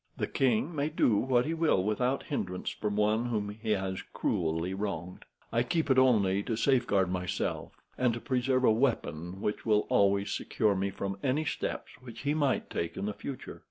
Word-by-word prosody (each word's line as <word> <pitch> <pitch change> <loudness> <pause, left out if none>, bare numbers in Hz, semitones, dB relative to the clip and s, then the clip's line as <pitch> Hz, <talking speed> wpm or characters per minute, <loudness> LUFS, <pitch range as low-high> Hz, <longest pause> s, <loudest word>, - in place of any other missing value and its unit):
The - - 0
king 135 +5 +1
may 145 +1 0
do 135 -8 +3
what 125 +1 +2
he 160 - -1
will 160 - +2
without 125 +6 0
hindrance 90 -11 -3
from 105 -1 -3
one 105 +2 +2
whom 105 -4 -1
he 110 +2 -6
has 95 -2 -2
cruelly 80 +2 -1
wronged. 95 -3 -4 0.3
I 115 - +2
keep 140 +4 0
it 130 - +5
only 100 -7 +4
to 115 +2 -2
safeguard 115 -7 +2
myself, 90 -1 -2 0.3
and 120 -2 +1
preserve 130 -1 +1
a 120 - +6
weapon 95 - -1
which 105 - -2
will 105 -2 +2
always 100 0 +3
secure 105 -2 +1
me 100 +1 -1
from 95 0 -4
any 140 +4 0
steps - - -3
which 120 -3 -10
he 145 +1 0
might 145 -4 0
take 85 0 -3
in - - -2
the 105 - -2
future. 130 +4 -7
110 Hz, 185 wpm, -30 LUFS, 95-130 Hz, 0.3 s, a